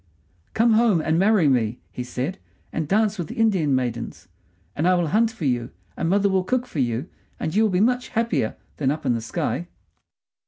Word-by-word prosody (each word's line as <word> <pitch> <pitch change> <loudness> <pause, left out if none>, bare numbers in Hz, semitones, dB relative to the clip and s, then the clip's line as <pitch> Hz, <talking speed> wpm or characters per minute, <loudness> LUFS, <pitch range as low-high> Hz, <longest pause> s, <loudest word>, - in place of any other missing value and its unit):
"Come 230 +1 +4
home 220 -5 +4
and 160 +1 +1
marry 195 -4 +4
me," 120 -3 +1
he 125 - -5
said, 130 +9 -4 0.3
"and 160 -2 -2
dance 210 +2 +1
with 170 - -3
the - - -8
Indian 190 -11 +2
maidens; 115 -9 -3 0.5
and 160 - +1
I 185 - +5
will 175 -3 0
hunt 225 +5 +3
for 220 -8 -6
you, 120 -3 0 0.3
and 165 - -1
my 190 - +3
mother 200 0 +2
will 190 -1 +1
cook 255 +5 0
for 245 - -6
you, 120 +4 -1 0.3
and 155 - -2
you 210 - +3
will 220 - +4
be 185 0 +1
much 245 +3 +2
happier 220 - 0 0.2
than 135 -3 +1
up 150 +2 -2
in 125 - +3
the 115 - -2
sky." 165 +8 -2
170 Hz, 210 wpm, -23 LUFS, 130-215 Hz, 0.5 s, I